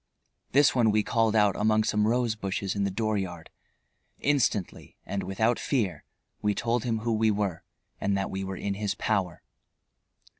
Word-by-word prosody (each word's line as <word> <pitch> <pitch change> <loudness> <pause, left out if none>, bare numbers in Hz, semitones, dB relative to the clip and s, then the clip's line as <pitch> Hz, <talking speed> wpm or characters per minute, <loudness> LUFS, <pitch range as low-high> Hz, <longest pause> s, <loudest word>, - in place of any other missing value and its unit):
This 140 +1 +5
one 120 -4 +3
we 105 0 +2
called 115 -1 +1
out 105 -3 +4
among 110 +1 +2
some 105 0 +1
rose 120 0 +1
bushes 100 -2 -3
in 100 -1 0
the - - 0
dooryard. 95 -5 -3 0.7
Instantly, 120 -9 0
and 100 - -3
without 110 +6 0
fear, 100 - -1 0.4
we 105 -1 +1
told 120 0 0
him 115 -2 -1
who 115 0 0
we 110 0 +2
were 100 -5 -1 0.4
and 100 0 0
that 95 - -2
we 95 0 -3
were 95 -1 -5
in 100 +1 -2
his 105 0 -2
power. 90 -5 -1
105 Hz, 165 wpm, -27 LUFS, 95-115 Hz, 0.7 s, This